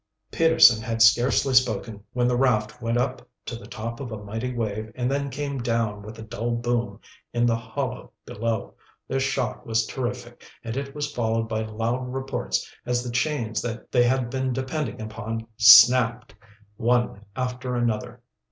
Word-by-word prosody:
Peterson 160 -9 +6
had 115 0 -3
scarcely 120 +4 +4
spoken 115 -4 +1
when 125 -1 +1
the 125 - +2
raft 115 -5 +1
went 115 +1 0
up 125 +1 -1 0.2
to 120 - -5
the 115 - -10
top 115 +1 -6
of 130 -4 -6
a 110 - -4
mighty 110 +5 -4
wave 110 -2 -3
and 125 0 -1
then 140 0 -1
came 140 0 -4
down 115 -3 -1
with 110 +2 -10
a 110 - -8
dull 115 +2 -3
boom 120 -3 -2 0.3
in 120 0 +2
the 115 -1 +3
hollow 125 +3 -5
below. 115 -2 -3 0.3
The 135 - -1
shock 135 -3 -1
was 115 -1 0
terrific, 120 -1 -5 0.2
and 115 0 -5
it 140 +1 -5
was 145 0 -3
followed 115 -1 0
by 110 0 -2
loud 115 +4 -3
reports 130 - -2 0.2
as 120 0 -1
the 125 - -5
chains 120 -4 -1
they 120 +1 0
had 120 -1 +1
been 130 -1 -1
depending 130 -1 -3
upon 110 +1 -5
snapped, 115 +2 +7 0.4
one 120 -3 +1
after 125 -1 -3
another. 115 -3 -2
120 Hz, 165 wpm, -25 LUFS, 115-125 Hz, 0.4 s, snapped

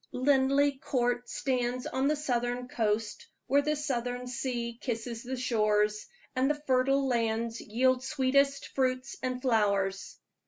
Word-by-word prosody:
Linleigh 275 +1 +3
Court 245 -2 -1
stands 250 -1 -1
on 265 +1 0
the 305 - +2
southern 245 -4 -1
coast, 220 -2 -1 0.2
where 280 +2 +3
the 300 +1 0
southern 250 -4 -2
sea 240 -2 -3
kisses 230 -2 -4
the 255 +1 -5
shores, 210 -3 +1 0.3
and 260 +2 +2
the 295 0 0
fertile 270 +1 +2
lands 230 -1 -1
yield 255 +3 +1
sweetest 275 0 +1
fruits 255 0 -1
and 255 0 -3
flowers. 200 -5 +1
250 Hz, 130 wpm, -30 LUFS, 235-265 Hz, 0.3 s, Linleigh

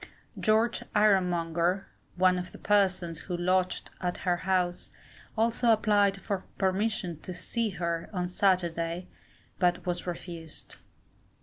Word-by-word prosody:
George 220 +2 +2
Ironmonger, 180 -3 +2 0.3
one 185 0 +4
of 180 0 -6
the - - -11
persons 185 -5 +1
who 180 -2 -4
lodged 185 +1 0
at 180 -1 -1
her 175 -1 +2
house, 180 -1 0 0.5
also 230 +2 +2
applied 205 -3 +3
for 195 -1 -3
permission 190 -2 0
to - - -23
to 185 - -6
see 230 +5 -1
her 170 -3 -3
on 180 -3 -1
Saturday, 175 -2 0 0.5
but 175 -1 +2
was 175 0 -2
refused. 170 -2 -7
185 Hz, 125 wpm, -29 LUFS, 175-200 Hz, 0.5 s, one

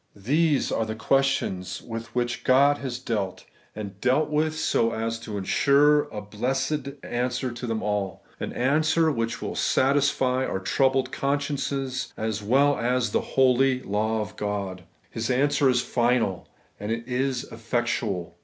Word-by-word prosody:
These 145 +9 +1
are - - +1
the 110 0 -4
questions 110 -9 0
with 115 -1 -7
which 120 0 -1
God 140 +3 +4
has 130 -3 -4
dealt, 105 -7 -3 0.3
and 100 -2 -7
dealt 145 +5 +2
with 155 +1 +1
so 115 -6 +1
as 115 +1 -2
to 110 -2 -6
ensure 145 +9 +4
a 105 - -6
blessed 135 +7 -2
answer 125 +1 -2
to 120 +1 -6
them 115 -1 -2
all; 105 -2 -2 0.2
an - - -4
answer 155 +5 +2
which 115 -3 -2
will - - -3
satisfy 130 -1 +2
our 95 - -2
own 95 - -8
troubled 130 +6 +2
consciences 140 -2 -2
as 110 -1 -2
well 135 +7 +3
as 120 -1 +1
the - - +1
holy 130 0 +2
law 110 +2 0
of 105 0 -6
God. 100 -3 -3 0.3
His 115 +1 -3
answer 140 +2 +3
is 125 -1 +2
finM, 120 -6 +1 0.3
and 105 +2 -4
it 115 +1 -3
is 130 0 -1
effectual. 115 -5 -2
125 Hz, 155 wpm, -25 LUFS, 110-135 Hz, 0.3 s, God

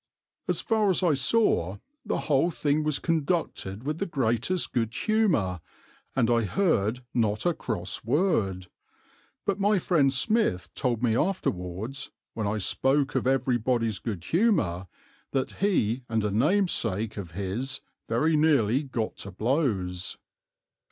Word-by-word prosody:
As - - +1
far 220 -3 +2
as 185 0 +2
I 170 -4 +4
saw, 135 - +2 0.3
the - - -2
whole 150 +3 +2
thing 150 -2 0
was 150 -2 +2
conducted 155 - -1
with 150 +3 -3
the 200 - -1
greatest 135 +4 0
good 115 -3 0
humour, 170 - +1 0.6
and 125 -4 +3
I 115 -1 +3
heard 115 - +1
not 110 -3 0
a 175 - +3
cross 90 - -4
word; 110 - +1 0.8
but 200 -1 0
my 205 +1 +3
friend 155 -6 +3
Smith 135 - +1
told 120 -2 -1
me 115 -2 +3
afterwards, 115 - -2 0.2
when 110 -2 -2
I 105 +2 0
spoke 135 +7 +1
of - - 0
everybody's 120 -4 +1
good 100 -7 -5
humour, 160 - +1 0.5
that 135 -1 0
he 130 - +1
and 110 -1 0
a 105 - 0
namesake 115 - +1
of 90 -5 -6
his 100 +9 -3 0.3
very 155 +8 +2
nearly 140 -6 +3
got 125 -6 -3
to 100 - -7
blows. 100 - -1
125 Hz, 140 wpm, -27 LUFS, 105-160 Hz, 0.8 s, I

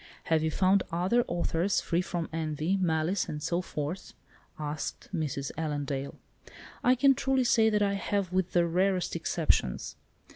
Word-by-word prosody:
"Have 160 -2 +2
you 160 - +1
found 185 +4 +3
other 185 +8 +2
authors 175 +2 0
free 170 +1 0
from 175 -2 -3
envy, 160 +2 -1
malice, 175 0 0
and 150 - -4
so 170 +3 0
forth?" 155 +1 -5 0.4
asked 150 -1 -5
Mrs. 140 -4 -2
Allendale. 145 -3 -3 0.7
"I 250 +1 +5
can 275 +2 +5
truly 265 0 +1
say 225 -2 +4
that 210 -1 +2
I 200 0 +1
have, 195 -2 -1
with 185 -1 0
the 175 -1 +4
rarest 185 +2 +1
exceptions. 60 - 0
175 Hz, 150 wpm, -29 LUFS, 155-195 Hz, 0.7 s, I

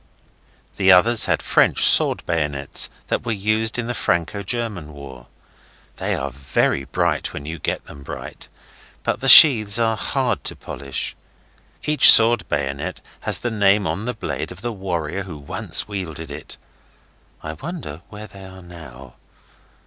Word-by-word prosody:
The 95 -1 +4
others 110 +5 +5
had - - -1
French - - +3
sword - - +4
bayonets 75 -4 -2 0.2
that - - -2
were 120 - -3
used 110 +3 -1
in 120 - -3
the 120 - -4
Franco 85 -2 -2
German 100 -7 -5
war. 65 -4 -12 0.7
They - - -2
are 70 +1 -5
very 70 +1 -1
bright 70 - -2
when 70 - -8
you 80 +1 -7
get - - -4
them 70 - -13
bright, - - -10 0.6
but - - -2
the 135 - -4
sheaths 110 -8 +9
are 115 -1 +1
hard - - -2
to - - -3
polish. 70 -2 -6 0.7
Each 150 -3 +7
sword 115 0 +5
bayonet 70 -1 -4 0.2
has - - 0
the 120 - -4
name 100 -1 +2
on 105 - -4
the 125 0 -4
blade - - -5
of - - -12
the 120 -1 -4
warrior 90 -3 -4
who 90 -5 -9
once 70 -1 -2
wielded 80 -7 -7
it. 75 +1 -9 0.9
I 80 - -6
wonder 85 - -8
where 105 0 -10
they 95 -1 -14
are 95 -1 -13
now. 70 -8 -13
95 Hz, 155 wpm, -20 LUFS, 75-110 Hz, 0.9 s, sheaths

